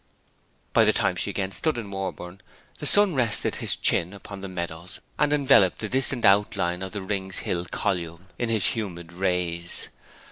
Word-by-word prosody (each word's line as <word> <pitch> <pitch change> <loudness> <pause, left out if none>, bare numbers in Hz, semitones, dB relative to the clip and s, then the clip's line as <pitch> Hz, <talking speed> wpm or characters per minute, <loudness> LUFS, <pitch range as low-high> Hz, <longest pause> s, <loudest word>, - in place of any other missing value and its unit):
By - - +6
the - - +4
time - - +1
she - - -1
again 95 -1 -2
stood 155 +7 0
in 105 -4 -5
Warborne 95 -1 -5 0.4
the - - -2
sun 205 -3 +5
rested 120 -6 0
his - - 0
chin 85 +3 +1
upon 100 0 -9
the 100 - -5
meadows, 85 -1 -6 0.2
and 150 0 +3
enveloped 135 -10 +5
the 110 - -4
distant 130 -1 +1
outline 95 -3 +3
of 95 -1 -6
the 100 - -4
Rings 95 -1 -2
Hill 90 -1 -1
column 85 0 -2
in 120 - -1
his 110 -4 +1
humid 85 -6 -5
rays. 90 -2 -2
95 Hz, 175 wpm, -25 LUFS, 90-110 Hz, 0.4 s, By